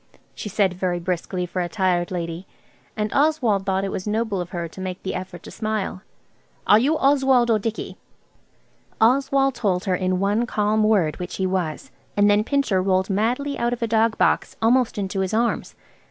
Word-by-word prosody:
she 210 Hz, -, -6 dB
said 195 Hz, -2 st, +1 dB
very 180 Hz, -1 st, -1 dB
briskly 180 Hz, +1 st, -2 dB
for 180 Hz, +1 st, -3 dB
a 175 Hz, -, -2 dB
tired 180 Hz, -3 st, 0 dB
lady; 170 Hz, 0 st, -5 dB, 0.5 s
and 210 Hz, -1 st, -2 dB
Oswald 255 Hz, -10 st, +2 dB
thought 190 Hz, 0 st, +1 dB
it 195 Hz, -, -2 dB
was 185 Hz, -, -5 dB
noble 215 Hz, -3 st, -1 dB
of 175 Hz, -, -6 dB
her 175 Hz, -2 st, -4 dB
to 175 Hz, +3 st, -11 dB
make 185 Hz, 0 st, -5 dB
the 190 Hz, -, -3 dB
effort 185 Hz, -1 st, -7 dB
to -, -, -10 dB
smile. 215 Hz, -4 st, -3 dB, 0.6 s
"Are 210 Hz, -, +6 dB
you 295 Hz, +7 st, +2 dB
Oswald 265 Hz, -4 st, +3 dB
or 220 Hz, -, +3 dB
Dicky?" 225 Hz, +2 st, -4 dB, 1.0 s
Oswald 270 Hz, +3 st, +3 dB
told 200 Hz, -6 st, -1 dB
her 190 Hz, -, +1 dB
in 185 Hz, 0 st, 0 dB
one 205 Hz, +5 st, +1 dB
calm 215 Hz, -1 st, +1 dB
word 200 Hz, -8 st, +2 dB
which 180 Hz, 0 st, -5 dB
he 190 Hz, -, -1 dB
was, 185 Hz, -, -2 dB, 0.3 s
and 205 Hz, 0 st, +5 dB
then 205 Hz, +1 st, +3 dB
Pincher 245 Hz, -7 st, +1 dB
rolled 190 Hz, +1 st, +1 dB
madly 245 Hz, +8 st, -1 dB
out 240 Hz, +1 st, 0 dB
of 240 Hz, -, -4 dB
a -, -, +1 dB
dog 225 Hz, 0 st, +2 dB
box -, -, +1 dB
almost 240 Hz, +1 st, +2 dB
into 195 Hz, -1 st, -2 dB
his 190 Hz, +2 st, -1 dB
arms. 235 Hz, +1 st, -1 dB
205 Hz, 190 wpm, -23 LUFS, 185-230 Hz, 1.0 s, Are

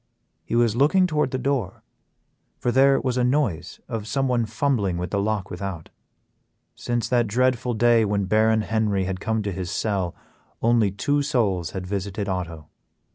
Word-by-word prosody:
He -, -, -3 dB
was 120 Hz, -2 st, +3 dB
looking 150 Hz, +9 st, +4 dB
toward 150 Hz, -5 st, 0 dB
the 130 Hz, -, -2 dB
door, 130 Hz, -6 st, -2 dB, 0.7 s
for 120 Hz, -, -1 dB
there 135 Hz, +2 st, +5 dB
was 130 Hz, -1 st, -1 dB
a -, -, +2 dB
noise 125 Hz, -, 0 dB
of 110 Hz, -2 st, -5 dB
someone 125 Hz, -3 st, 0 dB
fumbling 110 Hz, -6 st, 0 dB
with 90 Hz, 0 st, -4 dB
the 100 Hz, -, 0 dB
lock 100 Hz, -2 st, -2 dB
without. 90 Hz, -3 st, -6 dB, 0.8 s
Since 120 Hz, -1 st, -2 dB
that 120 Hz, -2 st, +2 dB
dreadful 125 Hz, +2 st, +1 dB
day 120 Hz, 0 st, +4 dB
when 100 Hz, -1 st, 0 dB
Baron 110 Hz, +2 st, +3 dB
Henry 105 Hz, -3 st, 0 dB
had 95 Hz, 0 st, -3 dB
come 110 Hz, +1 st, -1 dB
to 100 Hz, -, -2 dB
his 90 Hz, -1 st, -4 dB
cell, 95 Hz, -5 st, -1 dB, 0.4 s
only 115 Hz, -3 st, +3 dB
two 145 Hz, +9 st, 0 dB
souls 105 Hz, -, 0 dB
had 95 Hz, -1 st, -4 dB
visited 100 Hz, +1 st, -3 dB
Otto. 85 Hz, -5 st, -4 dB
110 Hz, 165 wpm, -24 LUFS, 95-125 Hz, 0.8 s, there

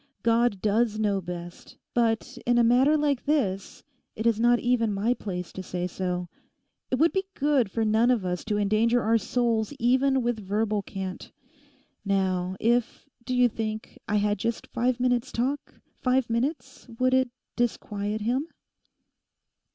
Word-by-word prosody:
God 230 Hz, -3 st, +2 dB
does 215 Hz, +1 st, +2 dB
know 205 Hz, -3 st, +1 dB
best; 175 Hz, 0 st, -8 dB, 0.2 s
but 230 Hz, -2 st, 0 dB
in 240 Hz, 0 st, +4 dB
a 240 Hz, -, +5 dB
matter 260 Hz, +6 st, +4 dB
like 290 Hz, -4 st, 0 dB
this 220 Hz, -11 st, -1 dB, 0.3 s
it 220 Hz, -, -4 dB
is 230 Hz, -2 st, +3 dB
not 240 Hz, +1 st, +5 dB
even 240 Hz, -3 st, +1 dB
my 205 Hz, +5 st, +1 dB
place 180 Hz, -7 st, -6 dB
to 190 Hz, -, -5 dB
say 180 Hz, -1 st, -4 dB
so. 180 Hz, 0 st, -3 dB, 0.6 s
It -, -, +1 dB
would 325 Hz, +6 st, +3 dB
be 385 Hz, 0 st, -1 dB
good 275 Hz, -6 st, +2 dB
for 225 Hz, +3 st, -1 dB
none 220 Hz, +3 st, +3 dB
of 235 Hz, -7 st, +2 dB
us 180 Hz, -1 st, -2 dB
to 210 Hz, -2 st, 0 dB
endanger 215 Hz, +4 st, +2 dB
our 225 Hz, +1 st, +3 dB
souls 230 Hz, +1 st, 0 dB
even 260 Hz, +2 st, +2 dB
with 240 Hz, -2 st, -1 dB
verbal 210 Hz, +1 st, -1 dB
cant. 190 Hz, -1 st, -6 dB, 0.7 s
Now, 190 Hz, -2 st, 0 dB
if, 235 Hz, +3 st, 0 dB, 0.2 s
do 255 Hz, -, -1 dB
you 250 Hz, 0 st, +5 dB
think, 220 Hz, -1 st, -5 dB
I 210 Hz, -, 0 dB
had 205 Hz, 0 st, +1 dB
just 230 Hz, 0 st, -2 dB
five 250 Hz, +1 st, -1 dB
minutes' 250 Hz, 0 st, +1 dB
talk—five 255 Hz, -1 st, -2 dB
minutes; 260 Hz, +7 st, -2 dB
would 255 Hz, +1 st, +2 dB
it 260 Hz, -1 st, +3 dB, 0.3 s
disquiet 210 Hz, -3 st, -2 dB
him? 250 Hz, +8 st, 0 dB
230 Hz, 155 wpm, -26 LUFS, 205-245 Hz, 0.7 s, a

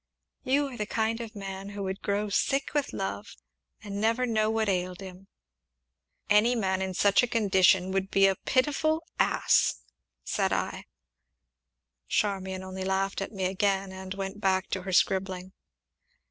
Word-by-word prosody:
"You 280 Hz, +2 st, +1 dB
are 250 Hz, -, -9 dB
the 210 Hz, -, -3 dB
kind 225 Hz, +1 st, -1 dB
of 230 Hz, -1 st, -8 dB
man 195 Hz, -1 st, -6 dB
who 200 Hz, 0 st, -5 dB
would 190 Hz, +1 st, -4 dB
grow 205 Hz, +1 st, -1 dB
sick 275 Hz, +7 st, 0 dB
with 290 Hz, -2 st, 0 dB
love, -, -, -5 dB, 0.5 s
and 200 Hz, -1 st, -5 dB
never 230 Hz, +3 st, +2 dB
know 215 Hz, -2 st, +1 dB
what 220 Hz, -1 st, 0 dB
ailed 180 Hz, -2 st, -1 dB
him." 190 Hz, 0 st, -10 dB, 1.0 s
"Any 215 Hz, +4 st, +4 dB
man 190 Hz, -4 st, 0 dB
in 190 Hz, -1 st, -3 dB
such 200 Hz, +2 st, +4 dB
a 245 Hz, -, 0 dB
condition 190 Hz, -5 st, +3 dB
would 195 Hz, 0 st, -1 dB
be 195 Hz, 0 st, +4 dB
a 195 Hz, -, +5 dB
pitiful 300 Hz, -, +1 dB, 0.2 s
ass!" -, -, +3 dB, 0.4 s
said 195 Hz, -2 st, 0 dB
I. -, -, -2 dB, 1.2 s
Charmian 190 Hz, -, -1 dB
only 190 Hz, 0 st, -6 dB
laughed 195 Hz, +1 st, -1 dB
at 195 Hz, -, -4 dB
me 190 Hz, -3 st, -3 dB
again, 195 Hz, +1 st, 0 dB
and 190 Hz, 0 st, -7 dB
went 195 Hz, +1 st, -5 dB
back 190 Hz, -1 st, +1 dB
to 190 Hz, -, -1 dB
her 190 Hz, +1 st, -5 dB
scribbling. 185 Hz, 0 st, +1 dB
195 Hz, 160 wpm, -28 LUFS, 190-220 Hz, 1.2 s, a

